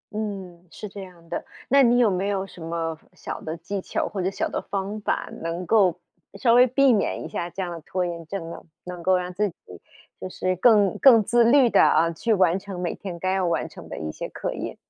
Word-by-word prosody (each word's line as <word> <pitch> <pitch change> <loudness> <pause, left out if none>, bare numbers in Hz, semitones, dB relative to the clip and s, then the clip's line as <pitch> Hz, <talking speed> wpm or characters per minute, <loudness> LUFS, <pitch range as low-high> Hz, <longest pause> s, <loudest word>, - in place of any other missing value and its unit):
嗯， 190 -5 -6
是 210 +6 -8
这 200 +1 -9
样 180 -3 -13
的， - - -4 0.2
那 275 +1 +5
你 245 0 +5
没 195 -1 0
有 195 -1 -1
什 180 -3 -14
么 165 -1 -3
小 - - -7
的 160 +1 -5
技 190 +4 -5
巧 - - -2
或 200 - -4
者 185 - 0
小 - - -2
的 - - -3
方 200 +2 -4
法， - - -1
能 165 +2 -4
够 185 -4 +3 0.4
稍 235 0 +4
微 250 +1 +7
避 265 0 +4
免 205 - -1
一 - - -4
下 175 0 -4
这 190 - -5
样 170 -2 -6
拖 180 +2 -2
延 170 -1 -5
症 170 -2 -5
呢？ - - -8 0.2
能 180 -1 -8
够 185 +2 +3
让 180 0 -4
自 205 +2 0
己 - - -17 0.7
就 185 - -5
是 185 0 -1
更 205 -2 +4
更 230 -6 +7
自 235 +3 +3
律 250 +2 +5
地， - - +4
啊， 165 0 +4
去 225 +7 -2
完 185 0 +3
成 195 -2 -8
每 175 -2 -2
天 185 -4 -7
该 185 +2 -1
要 190 -2 +1
完 170 - -1
成 - - -12
的 - - -6
一 75 -1 -4
些 - - -6
课 - - -4
业。 - - -6
185 Hz, 250 characters per minute, -24 LUFS, 175-210 Hz, 0.7 s, 微